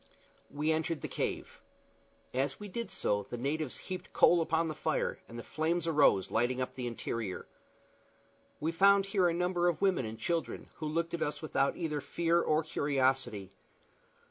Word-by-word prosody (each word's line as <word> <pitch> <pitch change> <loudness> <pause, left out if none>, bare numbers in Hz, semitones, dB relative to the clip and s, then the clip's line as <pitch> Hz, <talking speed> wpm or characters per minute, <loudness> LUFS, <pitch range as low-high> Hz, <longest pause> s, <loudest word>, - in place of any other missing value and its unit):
We 150 +2 0
entered 160 0 -1
the - - -3
cave. - - -4 0.7
As 135 +1 -1
we 205 - -7
did 230 +4 -4
so 100 -1 -1
the 120 - -4
natives 145 +3 -2
heaped 185 -1 -7
coal 175 -1 +6
upon 165 0 +1
the 155 - -2
fire, - - -1
and 115 - -8
the 120 - -6
flames 165 +2 -1
arose, 145 - +4
lighting 120 +3 +1
up 130 - -2
the 125 -2 -4
interior. 115 -4 -4 1.1
We 160 +2 0
found 195 +3 +5
here 195 -2 +2
a - - +2
number 180 0 +1
of 170 -3 +1
women 190 - +2
and 110 +1 -6
children, 155 0 -2
who 155 - -3
looked 165 +2 -1
at 170 - -2
us 150 - -2
without 145 -2 +1
either 155 -4 -2
fear 170 +4 +1
or 155 0 +2
curiosity. 130 -9 0
155 Hz, 170 wpm, -32 LUFS, 130-170 Hz, 1.1 s, coal